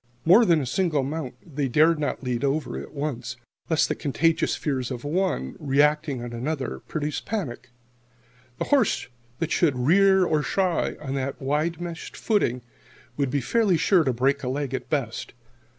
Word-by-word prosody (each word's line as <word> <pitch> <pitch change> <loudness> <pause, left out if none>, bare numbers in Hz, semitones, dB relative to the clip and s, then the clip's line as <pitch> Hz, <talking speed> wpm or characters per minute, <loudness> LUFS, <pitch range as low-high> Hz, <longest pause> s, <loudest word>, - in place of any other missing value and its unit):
More 205 +8 +7
than 170 -4 +4
a 140 - -2
single 155 0 +1
mount 140 -2 -4
they 145 -4 -2
dared 155 +5 +4
not 145 -2 -2
lead 125 -1 -2
over 145 +2 -1
at - - -7
once, 140 -5 -4 0.3
lest 160 -2 +3
the - - 0
contagious 165 +3 +1
fears 130 -5 -2
of 125 -2 -5
one, 160 - -1
reacting 145 -1 +1
on 120 -1 -6
another, 130 - -3
produce 150 -2 -3
panic. 185 - -4 0.9
The - - -1
horse 260 - +2 0.3
that 165 +2 -2
should 150 -7 +2
rear 190 +8 +4
or 155 -3 +1
shy, 175 +6 0
on 135 -3 -5
that 135 +1 -3
wide 150 +4 -1
meshed 170 -1 -7
footing, 125 - 0 0.5
would 140 -2 0
be 140 +1 0
fairly 205 - +2
sure 180 0 +4
to 135 - +1
break 135 +4 +1
a 125 - -4
leg, 135 0 -2
at 130 - -4
best. - - -3
150 Hz, 170 wpm, -25 LUFS, 130-165 Hz, 0.9 s, More